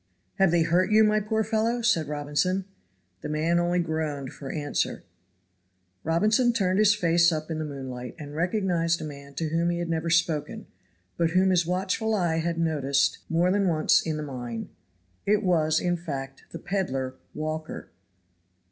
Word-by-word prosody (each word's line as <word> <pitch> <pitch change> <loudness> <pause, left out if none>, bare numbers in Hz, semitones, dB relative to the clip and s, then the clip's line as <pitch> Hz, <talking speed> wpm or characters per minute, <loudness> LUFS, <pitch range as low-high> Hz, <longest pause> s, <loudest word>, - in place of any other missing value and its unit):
"Have 195 -2 +5
they 170 0 +3
hurt 180 +4 +2
you, 215 +1 +6
my 215 0 +3
poor 220 +1 0
fellow?" 225 +2 0
said 170 -10 +2
Robinson. 150 +6 -1 0.6
The - - -5
man 160 +3 +1
only 175 +1 +1
groaned 155 -5 -2
for 135 -2 -7
answer. 145 -2 -2 1.0
Robinson 215 +9 +3
turned 190 -3 +1
his 205 -1 +5
face 170 -3 +3
up 155 0 -3
in 160 - -2
the 155 - -2
moonlight, 130 -4 -7
and 145 -3 -8
recognized 170 -1 0
a - - -6
man 140 -1 -10
to 160 +2 -2
whom 165 +2 +1
he 175 - -1
had 170 -1 -3
never 165 0 -1
spoken, 165 -3 0 0.5
but 170 -1 +2
whom 185 +2 +3
his 175 -2 +2
watchful 195 +5 0
eye 170 -5 +1
had 170 0 -1
noticed 145 -4 +1
more 170 +2 +2
than 200 0 +2
once 155 -3 +3
in 160 -2 -3
the 150 - -4
mine 120 -5 -6 0.6
it 210 +1 +3
was, 160 -4 +2
in 175 0 0
fact, 135 -5 -6
the - - -7
peddler 135 -10 -2 0.2
Walker. 155 +1 -5
165 Hz, 170 wpm, -26 LUFS, 150-185 Hz, 1.0 s, you